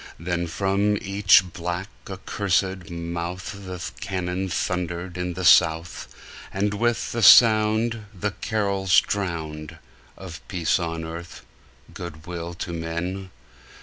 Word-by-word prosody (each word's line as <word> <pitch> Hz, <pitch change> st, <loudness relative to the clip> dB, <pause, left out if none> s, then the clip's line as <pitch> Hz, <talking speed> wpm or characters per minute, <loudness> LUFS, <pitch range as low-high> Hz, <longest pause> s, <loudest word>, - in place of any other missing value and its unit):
Then 85 Hz, 0 st, -2 dB
from 100 Hz, +5 st, +1 dB
each 100 Hz, -2 st, +4 dB
black, 90 Hz, +2 st, -4 dB, 0.2 s
accursed 95 Hz, -1 st, -1 dB
mouth 85 Hz, +1 st, -5 dB
The 90 Hz, -1 st, -6 dB, 0.2 s
cannon 95 Hz, 0 st, -3 dB
thundered 90 Hz, 0 st, -2 dB
in 90 Hz, -1 st, -3 dB
the 90 Hz, -, -3 dB
South, 80 Hz, +1 st, +4 dB, 0.4 s
And 100 Hz, +2 st, 0 dB
with 120 Hz, +2 st, 0 dB
the 115 Hz, -, -2 dB
sound 110 Hz, 0 st, +6 dB
The 105 Hz, 0 st, -3 dB
carols 100 Hz, -3 st, +2 dB
drowned 80 Hz, -6 st, -4 dB, 0.4 s
Of 90 Hz, -3 st, -9 dB
peace 90 Hz, -1 st, 0 dB
on 80 Hz, -1 st, -3 dB
earth, 85 Hz, +2 st, -8 dB, 0.5 s
good 80 Hz, -3 st, -8 dB
will 85 Hz, -1 st, -6 dB
to 85 Hz, 0 st, -5 dB
men! 85 Hz, +3 st, -4 dB
90 Hz, 115 wpm, -24 LUFS, 85-100 Hz, 0.5 s, sound